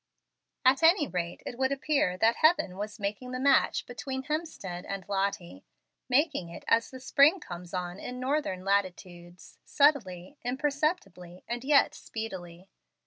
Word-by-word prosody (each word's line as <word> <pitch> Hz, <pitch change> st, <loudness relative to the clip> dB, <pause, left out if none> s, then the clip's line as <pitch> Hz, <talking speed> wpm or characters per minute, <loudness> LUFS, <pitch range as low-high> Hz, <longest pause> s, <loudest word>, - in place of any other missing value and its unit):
At 260 Hz, +3 st, +5 dB
any 325 Hz, -2 st, +5 dB
rate, 175 Hz, -1 st, -4 dB
it 245 Hz, -, -7 dB
would 265 Hz, 0 st, +1 dB
appear 275 Hz, -9 st, 0 dB
that 225 Hz, +4 st, +3 dB
Heaven 310 Hz, -, +3 dB
was 210 Hz, +3 st, -6 dB
making 210 Hz, +5 st, -4 dB
the 255 Hz, -, -3 dB
match 275 Hz, +1 st, +3 dB
between 265 Hz, +1 st, -5 dB
Hemstead 295 Hz, -, -4 dB
and 195 Hz, -1 st, -5 dB
Lottie, 195 Hz, -, -2 dB, 0.5 s
making 275 Hz, -, +1 dB
it 170 Hz, -, -10 dB
as 230 Hz, 0 st, +3 dB
the 260 Hz, -, -10 dB
spring 280 Hz, +7 st, +4 dB
comes 175 Hz, -, -9 dB
on 180 Hz, 0 st, -4 dB
in 250 Hz, 0 st, -6 dB
northern 255 Hz, -9 st, -2 dB
latitudes, 180 Hz, -3 st, -3 dB
subtilely, 270 Hz, -, +1 dB
imperceptibly, 260 Hz, -, -2 dB
and 240 Hz, +1 st, -4 dB
yet 280 Hz, +1 st, +4 dB
speedily. 185 Hz, -5 st, -8 dB
230 Hz, 140 wpm, -29 LUFS, 180-275 Hz, 0.5 s, At